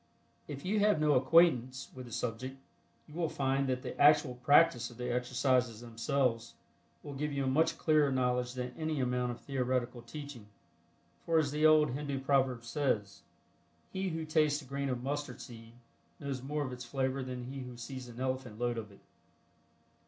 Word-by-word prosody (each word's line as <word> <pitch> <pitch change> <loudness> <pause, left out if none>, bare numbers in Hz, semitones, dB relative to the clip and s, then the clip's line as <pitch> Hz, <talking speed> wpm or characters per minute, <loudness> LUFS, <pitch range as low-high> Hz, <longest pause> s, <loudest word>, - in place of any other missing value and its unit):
If 140 +1 -7
you 210 +3 +1
have 205 -5 +3
no 150 -1 +3
acquaintance 130 -2 +3
with 130 -1 -9
the - - -12
subject, 125 +4 -4 0.5
you 150 - -14
will 165 -1 -1
find 135 -1 0
that 130 0 -1
the - - -5
actual 150 -2 +6
practice 125 0 +4
of 120 - -14
the 125 0 -2
exercises 125 -2 +1
themselves 115 0 -1 0.5
will 145 - -7
give 150 +2 -2
you 140 -1 -1
a - - -1
much 160 +5 +2
clearer 150 -3 +3
knowledge 125 -1 0
than 125 0 -4
any 155 -2 -2
amount 125 -1 0
of 120 - -8
theoretical 125 -2 -1
teaching, 120 -2 -9 0.8
for 165 -1 +2
as 150 -3 +2
the 150 +1 +4
old 155 -3 +5
Hindu 140 0 -3
proverb 130 -3 +1
says, 115 -5 -1 0.7
"He 190 0 -1
who 160 -1 -3
tastes 155 -2 +2
a - - -14
grain 140 +1 -3
of 125 -1 -3
mustard 145 +2 -3
seed 115 -2 -11 0.5
knows 140 -3 -4
more 145 +3 -2
of 130 - -5
its 125 0 -7
flavor 130 +2 -1
than 125 -1 -5
he 135 +2 -6
who 125 -2 -8
sees 130 +1 -7
an 120 0 -10
elephant 130 -4 -3
load 120 0 -1
of 105 -2 -8
it." 100 - -18
130 Hz, 180 wpm, -32 LUFS, 125-145 Hz, 0.8 s, actual